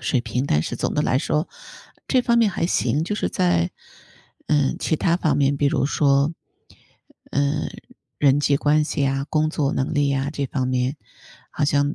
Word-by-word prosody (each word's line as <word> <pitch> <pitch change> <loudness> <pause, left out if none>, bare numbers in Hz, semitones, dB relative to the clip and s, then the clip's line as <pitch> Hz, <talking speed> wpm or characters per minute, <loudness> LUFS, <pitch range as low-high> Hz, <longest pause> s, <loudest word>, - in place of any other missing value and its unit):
水 130 - 0
平， 125 +3 -2
但 75 +1 +2
是 - - -4
总 - - -2
的 - - +1
来 130 - +1
说 155 +3 -1 0.6
这 255 -2 +2
方 235 -1 +2
面 225 -3 +4
还 175 - -2
行。 155 -3 +1
就 190 - -3
是 - - -1
在， 85 -1 +1 0.7
嗯， 145 -3 +1
其 160 - 0
它 170 +2 +1
方 155 -6 +1
面， 140 0 +2
比 145 - +1
如 140 -1 +1
说， 140 +1 +2 1.0
呃， 145 +2 0 0.5
人 145 0 +4
际 140 -1 +2
关 150 +2 +2
系 145 -1 -2
呀、 135 +1 0
工 155 0 +1
作 150 -3 -1
能 135 +4 -1
力 145 -2 +1
呀、 140 +1 -1
这 140 -2 -2
方 130 -2 -2
面。 130 +3 -1 0.6
好 150 - +1
像 145 0 +1
145 Hz, 200 characters per minute, -22 LUFS, 135-155 Hz, 1.0 s, 面